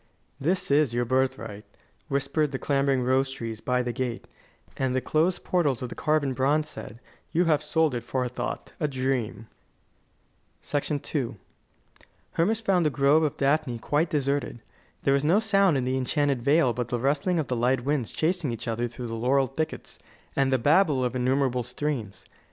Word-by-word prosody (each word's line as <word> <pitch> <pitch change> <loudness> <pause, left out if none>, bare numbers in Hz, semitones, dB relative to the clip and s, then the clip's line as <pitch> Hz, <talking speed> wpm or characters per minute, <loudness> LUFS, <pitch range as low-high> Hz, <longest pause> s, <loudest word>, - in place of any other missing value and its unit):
"This 170 +3 0
is 140 -4 +3
your 120 0 +1
birthright," 130 -4 -1 0.4
whispered 140 +2 0
the 135 - -2
clambering 135 -1 +1
rose 130 +2 +2
trees 115 -4 -6
by 125 0 0
the 120 -1 -3
gate; 125 -1 -3 0.5
and 130 -1 -1
the - - +3
closed 160 +7 0
portals 145 -9 +1
of 125 - -5
carven 150 -3 +1
bronze 145 +4 +1
said: 115 -6 -9 0.3
"You 175 +3 +2
have 155 -3 +3
sold 160 -4 +1
it 120 - -2
for 125 +2 -2
a - - -1
thought 125 - -5
a 150 - +1
dream."' 130 -5 -2 1.3
II 145 -3 -1 1.0
Hermas 215 +7 +1
found 190 -5 +2
the - - +3
Grove 140 +2 +3
of 150 -3 -1
Daphne 135 -3 +1
quite 150 +8 0
deserted. 140 -5 -1 0.4
There 135 - +3
was 140 0 +2
no 165 +6 +4
sound 200 -7 +3
in 130 - -1
the 130 +1 0
enchanted 140 0 0
vale 140 -1 +3
but 120 0 -3
the 120 - -1
rustling 145 +7 +1
of 155 - 0
the 125 - -2
light 125 +2 +1
winds 140 -5 0
chasing 165 -4 0
each 115 +1 -6
other 115 +1 -1
through 120 +1 -8
the 115 - -5
laurel 130 +4 +2
thickets, 155 +5 -5 0.4
and 135 -1 +2
the 130 - +4
babble 145 +1 +3
of 125 0 -2
innumerable 130 0 +1
streams. 120 -4 -4
135 Hz, 175 wpm, -26 LUFS, 125-150 Hz, 1.3 s, no